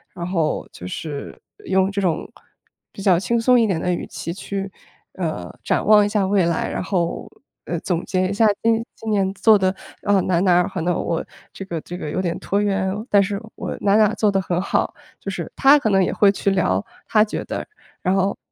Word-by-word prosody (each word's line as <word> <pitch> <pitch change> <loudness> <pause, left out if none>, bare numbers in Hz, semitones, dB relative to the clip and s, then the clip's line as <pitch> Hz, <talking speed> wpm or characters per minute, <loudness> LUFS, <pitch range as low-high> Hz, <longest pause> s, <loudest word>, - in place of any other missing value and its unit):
然 170 - -4
后 170 -4 -1
就 90 - -10
是 145 - -6 0.3
用 190 0 +2
这 200 - -2
种 175 -5 0 0.7
比 - - -10
较 190 -3 +4
轻 235 +4 0
松 250 +1 +5
一 230 - +4
点 190 -6 0
的 180 - 0
语 175 - -2
气 170 - -6
去， 195 +1 -5 0.4
呃， 155 - -4
展 - - 0
望 210 0 +6
一 205 - -1
下 205 -2 +1
未 190 -2 +2
来， 170 -1 0
然 - - -3
后， 175 -3 -2 0.4
呃， 170 - -3
总 175 +1 -2
结 185 -1 0
一 - - -2
下 205 +3 +3 0.2
今 230 0 +2
今 225 - -7
年 195 -2 +1
做 215 +2 +5
的， 190 -1 +1 0.3
呃， 205 -2 +3
哪 180 - 0
儿 170 - +2
哪 185 -2 +4
儿， - - -2
可 185 - -4
能 175 +2 +1
我 165 -1 -2 0.3
这 195 - -8
个 170 -4 -4
这 175 +3 -7
个 150 - -5
有 185 - -1
点 170 -2 -2
拖 200 +1 -1
延， 195 -2 0 0.2
但 200 -1 +5
是 200 +1 -3
我 - - -5
哪 200 0 +3
哪 215 0 +4
做 210 -1 +2
得 195 - +1
很 180 -1 -1
好。 - - 0 0.3
就 - - -5
是 - - -5
他 280 +2 +6
可 225 - 0
能 195 -2 +4
也 - - -2
会 200 -1 +5
去 200 0 0
聊， 100 - +1 0.2
他 215 -1 +4
觉 215 - -4
得， - - -4 0.4
然 185 - +2
后 195 +1 +1
195 Hz, 245 characters per minute, -21 LUFS, 175-205 Hz, 0.7 s, 望